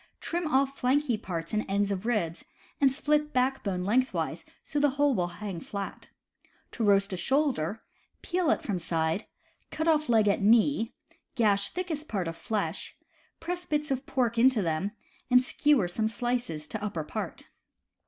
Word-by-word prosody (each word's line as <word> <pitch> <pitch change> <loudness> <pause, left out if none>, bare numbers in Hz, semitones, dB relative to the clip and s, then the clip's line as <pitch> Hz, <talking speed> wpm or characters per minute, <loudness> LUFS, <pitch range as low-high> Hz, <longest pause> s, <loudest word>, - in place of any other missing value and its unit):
Trim 345 0 -2
off 275 -1 +1
flanky 260 0 +2
parts 170 -5 -5
and 215 - +1
ends 200 +1 +1
of 200 +3 -3
ribs, 185 -8 -1 0.4
and 275 -2 +5
split 300 +2 +1
backbone 250 -8 0
lengthwise 255 +7 0 0.2
so 295 - -2
that 290 - +5
the 270 - -2
whole 285 -2 +3
wifl 175 -2 -1
hang 195 -1 -5
flat. 200 +4 -6 0.6
To 235 - -3
roast 200 -1 +3
a - - -2
shoulder, 235 - 0 0.4
peel 360 -2 0
it - - +2
from 195 -5 -2
side, 165 +3 -1 0.4
cut 315 - -2
off 305 -3 +3
leg 220 -3 +4
at 200 - +2
knee, 230 +3 +3 0.4
gash 200 -3 +3
thickest 325 -4 -4
part 190 -5 -2
of 165 - -4
flesh, 205 +5 -3 0.4
press 355 +1 -4
bits 300 -1 -1
of 265 +1 -2
pork 235 -3 0
into 245 -3 +5
them, 165 +4 0 0.4
and 250 0 +6
skewer 260 -5 +2
some 220 +5 0
slices 235 -9 -2
to 215 -1 -4
upper 200 -7 -2
part. - - -5
230 Hz, 165 wpm, -28 LUFS, 195-275 Hz, 0.6 s, and